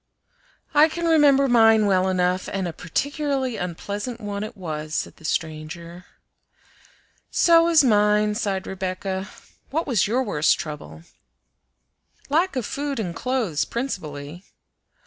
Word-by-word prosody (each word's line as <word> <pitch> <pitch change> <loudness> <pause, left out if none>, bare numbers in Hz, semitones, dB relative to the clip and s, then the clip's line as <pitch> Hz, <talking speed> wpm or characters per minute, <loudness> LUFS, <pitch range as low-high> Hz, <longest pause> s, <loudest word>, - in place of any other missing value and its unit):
"I 300 +2 +6
can 340 +2 -4
remember 290 -4 +5
mine 225 -3 +5
well 190 -1 +2
enough, 180 0 0
and 195 -2 -2
a 170 - -5
particularly 270 - -2
unpleasant 205 +7 -5
one 205 -2 -4
it 215 - -8
was," 155 -3 -5
said - - -3
the 160 - -14
stranger. 160 +3 -4 1.2
"So 335 -1 +5
was 330 -3 +5
mine," 210 -2 +3
sighed 200 -3 -2
Rebecca. 190 0 -4 0.4
"What 320 +4 -1
was 235 -9 +1
your 245 +5 +1
worst 160 -9 +2
trouble?" 80 - -7 1.3
"Lack 335 +5 +1
of 250 -4 -2
food 280 -2 -3
and 175 -6 -3
clothes 235 - -1
principally." 165 - -5
205 Hz, 125 wpm, -23 LUFS, 175-265 Hz, 1.3 s, I